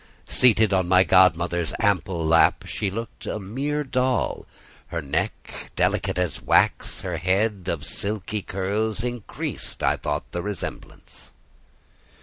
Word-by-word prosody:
Seated 110 -4 +4
on 95 -2 +2
my 90 +1 +6
godmother's 85 -2 +3
ample 95 -6 +1
lap, 80 +1 +4
she 100 - -2
looked 115 +4 -7
a - - -3
mere 140 +9 -2
doll; 130 -1 -1 0.4
her 85 - -3
neck, 70 -3 -4
delicate - - 0
as 90 -5 -1
wax, - - +2
her 90 -3 -3
head 95 +2 0
of 80 -4 -2
silky 105 0 -2
curls, 105 +4 -2
increased, 120 -3 -4
I - - +2
thought, 75 +1 -3
the 85 - -3
resemblance. 100 -1 -7
95 Hz, 130 wpm, -24 LUFS, 85-110 Hz, 0.4 s, my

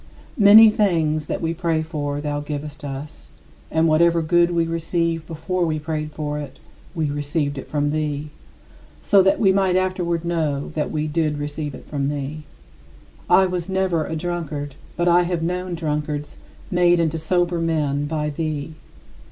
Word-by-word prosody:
Many 215 +2 +9
things 160 -7 +1
that - - -3
we 165 0 0
pray 165 -2 0
for 145 -3 -3
thou 145 -1 -2
givest 145 +1 -6
us, 140 +1 -7 0.4
and 160 +1 +2
whatever 165 +1 +3
good 175 +2 +3
we 170 -1 +1
receive 165 0 -1
before 180 +3 -2
we 160 -2 0
prayed 155 0 -4
for 150 -1 -4
it, 140 -2 -8 0.4
we 155 -3 -1
receive 145 0 -2
it 135 - -7
from 145 -1 0
thee, 150 -1 -2 0.7
so 200 - +5
that 195 +1 +3
we 195 -3 +5
might 190 -1 +2
afterward 180 -3 0
know 155 -5 -1
that 150 -1 -1
we 155 -1 -2
did 155 -1 0
receive 145 -1 -4
it - - -12
from 140 -2 -3
thee. 145 +2 -4 0.8
I - - +7 0.3
never 190 -4 +1
was - - -7
a - - -2
drunkard, 155 -4 -4 0.2
but 175 0 +1
I 175 0 +5
have 175 -2 -1
known 180 +1 -2
drunkards 150 -2 -3 0.3
made 175 -1 +4
into 165 -1 0
sober 175 +1 0
men 150 -3 0
by 150 -1 -2
thee. 155 0 -3
160 Hz, 165 wpm, -22 LUFS, 150-175 Hz, 0.8 s, Many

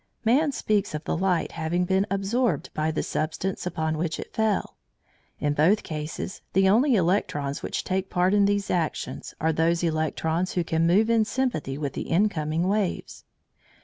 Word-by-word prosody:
Man 280 +7 +3
speaks 210 - 0
of 150 - -5
the - - -1
light 180 -1 0
having 170 +3 -1
been 190 +2 +1
absorbed 195 - 0
by 155 +1 0
the 160 - -1
substance 175 +4 -2
upon 160 -2 -2
which 165 -1 -2
it - - -8
fell. 220 -3 0 0.6
In 145 0 0
both 170 +9 +3
cases 155 +3 -5
the 190 +1 +4
only 240 +7 +4
electrons 165 -7 0
which - - -3
take 190 +1 -2
part 180 +2 +2
in 205 -1 +4
these 200 0 0
actions 170 -3 -2
are 160 +1 +1
those 165 +2 +1
electrons 160 +2 0
who 175 - +1
can 165 0 +1
move 210 +6 +4
in 225 -1 +4
sympathy 215 - -2
with 145 -2 -3
the - - -5
incoming 165 -3 +1
waves. 200 -2 -2
180 Hz, 170 wpm, -26 LUFS, 160-200 Hz, 0.6 s, the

